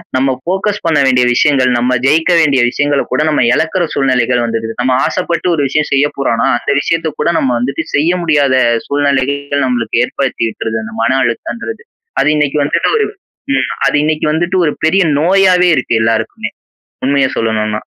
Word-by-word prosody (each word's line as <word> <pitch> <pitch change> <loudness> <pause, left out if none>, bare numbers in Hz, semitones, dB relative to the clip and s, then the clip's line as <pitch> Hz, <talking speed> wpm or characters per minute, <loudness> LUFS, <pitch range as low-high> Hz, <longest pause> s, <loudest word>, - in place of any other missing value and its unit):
நம்ம 135 +1 +1
ஃபோக்கஸ் 195 +4 -2
பண்ண 165 -2 +2
வேண்டிய 125 -1 +3
விஷயங்கள், 130 0 +2
நம்ம 125 +1 +1
ஜெயிக்க 160 +5 +2
வேண்டிய 140 -5 +3
விஷயங்களகூட 145 +2 -1
நம்ம 150 - +1
இழக்குற 170 +5 0
சூழ்நிலைகள் 125 -3 +1
வந்துருது. 115 -1 -3
நம்ம 125 +1 +1
ஆசப்பட்டு 180 0 -2
ஒரு 145 - -1
விஷயம் 150 +3 0
செய்ய 140 +1 +3
போறோன்னா, 130 -4 0
அந்த 140 +3 -1
விஷயத்தக் 165 +1 -2
கூட 160 - +1
நம்ம 130 -2 0
வந்து 140 +6 -3
செய்ய 165 +5 +2
முடியாத 145 -5 +2 0.3
சூழ்நிலைகள் 140 0 -1
நம்மளுக்கு 120 -2 0
ஏற்படுத்தி 135 -4 -2
இருக்கிறது 110 0 -4
அந்த 110 - -9
மன 130 +3 +1
அழுத்தம்ன்றது. 235 - -4 0.4
அது - - +1
இன்னக்கி 150 0 0
வந்துட்டு 140 - 0
ஒரு 435 - +1 0.5
ம் - - -1 0.2
அது - - 0
இன்னிக்கு 155 0 -1
வந்துட்டு 175 +3 -1
ஒரு 150 - 0
பெரிய 185 +3 +3 0.2
நோயாவே 180 0 +3
இருக்கு 125 -3 -1
எல்லாருக்குமே! 110 0 -1 0.5
உண்மைய 135 0 +2
சொல்லணுன்னா. 110 -1 -1
140 Hz, 160 wpm, -13 LUFS, 125-160 Hz, 0.5 s, வேண்டிய